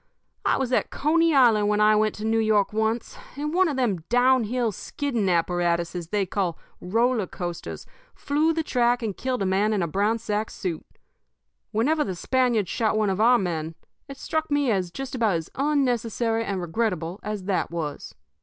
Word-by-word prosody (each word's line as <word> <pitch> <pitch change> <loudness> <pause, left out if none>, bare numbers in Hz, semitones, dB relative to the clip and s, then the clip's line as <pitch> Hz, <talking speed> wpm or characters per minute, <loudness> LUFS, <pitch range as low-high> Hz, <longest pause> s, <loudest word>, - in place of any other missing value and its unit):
I - - +2
was 260 -1 -2
at - - +1
Coney 330 +3 +2
Island 225 -6 +5
when 210 0 +1
I 215 0 +5
went 215 0 +1
to 210 - -6
New 225 0 +2
York 215 -2 +2
once, 220 +2 -1 0.2
and 300 +2 -3
one 370 +1 +4
of 290 -4 -2
them 235 -8 +1
down 245 0 +4
hill 240 0 0
skidding 235 -1 -2
apparatuses 170 0 0
they 205 +2 0
call 185 -2 -2 0.2
'roller 225 +2 +1
coasters' 175 -1 -6 0.3
flew 300 +3 +1
the 325 0 -1
track 245 -3 +1
and 210 -4 -2
killed 255 -5 -2
a - - 0
man 200 +3 +2
in 200 -4 0
a - - -1
brown 205 +7 +1
sack 215 -1 -2
suit. 170 -5 -4 0.9
Whenever 295 +8 +1
the 190 - -4
Spaniards 245 -1 +1
shot 220 -2 0
one 210 -2 +2
of 190 +2 -1
our 245 +2 +6
men, 165 -5 -3 0.3
it 275 -1 -9
struck 315 +2 -2
me 290 -4 +2
as 185 -4 0
just 270 +9 -7
about 225 -7 +1
as 165 -1 -4
unnecessary 240 -5 0
and 195 -2 -2
regrettable 180 -1 -2
as 210 -2 -4
that 190 0 -1
was. 160 -4 -5
220 Hz, 185 wpm, -25 LUFS, 190-255 Hz, 0.9 s, our